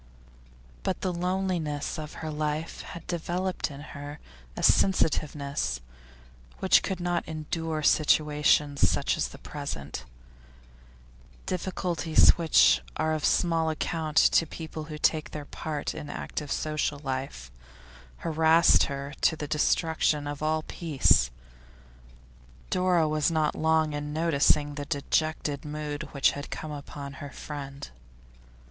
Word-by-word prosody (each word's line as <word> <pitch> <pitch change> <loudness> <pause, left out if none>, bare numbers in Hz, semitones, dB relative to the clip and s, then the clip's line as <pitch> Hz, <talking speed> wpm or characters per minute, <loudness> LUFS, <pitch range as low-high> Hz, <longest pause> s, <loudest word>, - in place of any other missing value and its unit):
But - - -2
the 185 - -1
loneliness 175 -5 -2
of 155 0 -7
her 155 - -3
life 150 +1 -3
had 170 - -9
developed 175 +2 -2
in 140 -1 -9
her 145 0 -8 0.4
a - - -4
sensitiveness 150 - +2 0.8
which - - +5
could 190 -2 -3
not 175 -1 -1
endure 160 0 -3
situations 150 -1 +3
such - - +1
as - - -1
the - - -12
present; 110 - -6 1.4
difficulties 175 -3 +2
which 165 -2 +4 0.2
are 155 0 +1
of 155 -2 -2
small 165 -2 +2
account 160 0 -3
to 165 - +5
people 160 0 -7
who 155 -1 -7
take 155 +1 +1
their 150 -1 -7
part 150 0 -4
in 145 - -7
active 145 -2 -5
social 150 -1 -1
life, 130 - -5 0.7
harassed 160 +1 +5
her 140 0 -5
to 160 - +3
the 150 -1 -5
destruction 155 0 +1
of 145 0 -5
all 155 0 0
peace. 150 - +2 1.4
Dora 180 -3 +3
was 155 +1 +1
not 155 -2 +1
long 160 -1 +2
in 145 0 -4
noticing 150 -2 +2
the 145 0 -5
dejected 145 0 -1
mood 150 0 -5
which 140 - +3
had 145 +1 -7
come 155 - -5
upon 140 -1 -7
her 145 - -6
friend. 140 - -8
155 Hz, 125 wpm, -28 LUFS, 145-160 Hz, 1.4 s, which